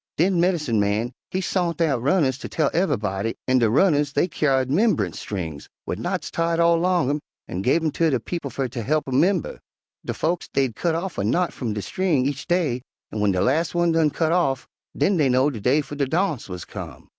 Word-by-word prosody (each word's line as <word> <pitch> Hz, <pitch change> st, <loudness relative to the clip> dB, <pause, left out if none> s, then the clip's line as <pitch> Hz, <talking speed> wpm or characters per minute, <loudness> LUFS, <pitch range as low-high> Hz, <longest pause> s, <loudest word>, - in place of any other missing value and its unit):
Den 180 Hz, +2 st, +2 dB
medincin' 155 Hz, -, +1 dB
man 105 Hz, +4 st, 0 dB, 0.2 s
he 185 Hz, -, -2 dB
sont 175 Hz, -3 st, -1 dB
out 145 Hz, -8 st, +1 dB
runners 140 Hz, -2 st, +2 dB
ter -, -, -6 dB
tell 155 Hz, -4 st, 0 dB
ev'b'dy, 115 Hz, -, 0 dB
an' 130 Hz, 0 st, +4 dB
de 115 Hz, -2 st, +3 dB
runners 145 Hz, -, +3 dB
dey 175 Hz, -, +2 dB
kyar'd 135 Hz, -4 st, +1 dB
'memb'ance 145 Hz, -, +1 dB
strings 80 Hz, -8 st, -5 dB, 0.2 s
wid -, -, -3 dB
knots -, -, -3 dB
tied 165 Hz, 0 st, 0 dB
all 170 Hz, 0 st, +5 dB
'long 180 Hz, -4 st, +2 dB
'em, 145 Hz, -, -1 dB, 0.3 s
an' 90 Hz, -, -4 dB
give 135 Hz, +10 st, +2 dB
'em 155 Hz, -, +1 dB
ter 165 Hz, +2 st, +2 dB
de 130 Hz, -4 st, +1 dB
people 165 Hz, +3 st, -5 dB
fer 135 Hz, 0 st, -2 dB
ter 120 Hz, 0 st, -5 dB
he'p 150 Hz, +7 st, +1 dB
'em 130 Hz, 0 st, +1 dB
'member. 180 Hz, +2 st, +1 dB, 0.4 s
De -, -, -3 dB
folks 170 Hz, +2 st, -1 dB
dey'd 130 Hz, -5 st, 0 dB
cut 170 Hz, +3 st, 0 dB
off 175 Hz, 0 st, -3 dB
a -, -, 0 dB
knot 170 Hz, -, +1 dB
f'um 115 Hz, -5 st, -4 dB
de 105 Hz, -, -3 dB
string 165 Hz, -, 0 dB
each 140 Hz, 0 st, -3 dB
day, 160 Hz, -9 st, +1 dB, 0.3 s
an' 110 Hz, -, -4 dB
w'en 105 Hz, -1 st, +3 dB
de 95 Hz, -, 0 dB
las' 155 Hz, -, +1 dB
one 175 Hz, -1 st, +3 dB
done 160 Hz, -2 st, +3 dB
cut 160 Hz, +2 st, 0 dB
off, 140 Hz, -7 st, +1 dB, 0.3 s
den 195 Hz, -1 st, +2 dB
dey 145 Hz, -4 st, +3 dB
know 130 Hz, +3 st, +3 dB
de 115 Hz, -6 st, -7 dB
day 135 Hz, +7 st, +3 dB
fer 145 Hz, 0 st, -10 dB
de 140 Hz, -2 st, -1 dB
darnse 160 Hz, -, -1 dB
wuz 90 Hz, -2 st, -6 dB
come. -, -, -9 dB
145 Hz, 225 wpm, -23 LUFS, 125-170 Hz, 0.4 s, all